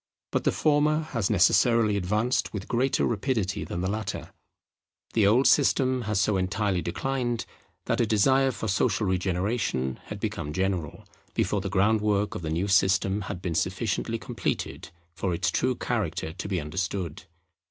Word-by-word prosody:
But - - -1
the - - +4
former 155 +1 +2
has 115 -7 0
necessarily 110 +2 +4
advanced 105 +6 0
with 100 -1 -5
greater 130 +3 +1
rapidity 105 -4 -1
than 85 - -4
the 95 - -1
latter. 105 -1 -4 0.8
The 105 -3 +4
old 120 +6 +4
system 130 -2 +3
had 105 - +1
so 100 +1 +2
entirely 95 0 0
declined, 120 +6 -2 0.4
that - - +1
a 115 - +2
desire 130 +6 +3
for 110 -3 -4
social 105 +2 +1
regeneration 95 - -1
had - - -7
become 75 - -3
general, 95 -4 -2 0.3
before 105 - +1
the 100 - -3
groundwork 105 +1 +2
of - - -5
the 80 - -4
new 85 +5 -1
system 95 +1 +3
had 90 -3 -6
been 90 -3 -2
sufficiently 95 +7 -1
completed 110 - -4 0.2
for 90 0 -2
its - - 0
true - - +1
character 80 - -2
to 95 - -6
be 95 -3 -1
understood. 85 +1 -4
100 Hz, 155 wpm, -27 LUFS, 95-115 Hz, 0.8 s, the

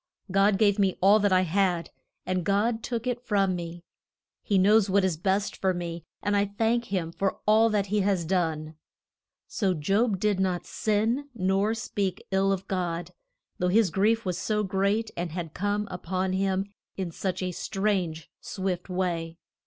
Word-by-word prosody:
God 195 +1 +4
gave 205 -1 +3
me 195 -2 +2
all 200 +3 +6
that 205 -1 +2
I 185 0 +5
had, 180 -1 0 0.3
and 185 -1 -1
God 215 +5 +1
took 235 0 -3
it 245 -1 -1
from 200 -6 +1
me. 170 0 -6 0.6
He 200 - +1
knows 205 +2 +5
what 195 0 +3
is 185 -3 +1
best 195 +5 0
for 190 -1 0
me, 170 -1 -5 0.2
and 205 0 +1
I 200 0 +3
thank 235 +1 +2
him 180 -6 -2
for 195 +2 -1
all 220 +2 +5
that 210 -2 +1
he 210 +2 0
has 190 -4 +1
done. 160 -3 -1 0.7
So 195 -5 0
Job 195 +6 +1
did 205 -1 +1
not 180 -2 0
sin, 225 +7 0
nor 195 +2 +1
speak 200 -4 -3
ill 195 0 +2
of 195 -1 -2
God, 175 -2 -2 0.5
though 180 - +1
his 200 0 +3
grief 220 +5 +2
was 180 -1 -2
so 210 +2 0
great 200 +3 0
and 170 -2 -4
had 165 -3 -5
come 205 +1 -1
up 180 -1 -8
on 185 0 0
him 190 0 0 0.3
in 185 -3 -3
such 185 +2 -3
a 180 - -1
strange, 185 -5 -2
swift 190 -2 -4
way. 170 -3 -2
195 Hz, 175 wpm, -27 LUFS, 180-205 Hz, 0.7 s, all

